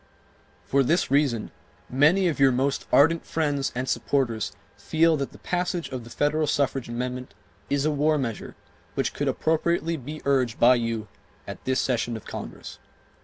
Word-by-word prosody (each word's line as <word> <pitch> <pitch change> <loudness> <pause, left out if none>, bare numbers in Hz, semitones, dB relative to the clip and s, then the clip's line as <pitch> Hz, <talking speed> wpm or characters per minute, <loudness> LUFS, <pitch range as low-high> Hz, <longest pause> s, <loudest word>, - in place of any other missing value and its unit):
For 140 - +2
this 155 +2 +1
reason 135 -6 +1 0.4
many 155 +9 +4
of 160 -5 -1
your 135 -1 +6
most 135 +2 -1
ardent 165 +4 +5
friends 145 -4 -1
and 125 +1 -2
supporters 120 -7 0 0.2
feel 160 +11 +2
that 140 -1 -3
the - - -14
passage 180 -1 -2
of 130 -3 -6
the - - -11
federal 150 +4 0
suffrage 135 -3 0
amendment 125 +1 -4 0.3
is 140 0 +1
a 155 - +2
war 150 +1 +2
measure 115 -6 -4 0.4
which - - -1
could - - -2
appropriately 165 +1 0
be 150 +3 -7
urged 130 -4 +1
by 120 +2 +7
you 115 -3 -2 0.4
at - - -8
this 130 0 +1
session 120 -2 0
of 110 - -13
Congress. - - -8
140 Hz, 165 wpm, -25 LUFS, 125-155 Hz, 0.4 s, by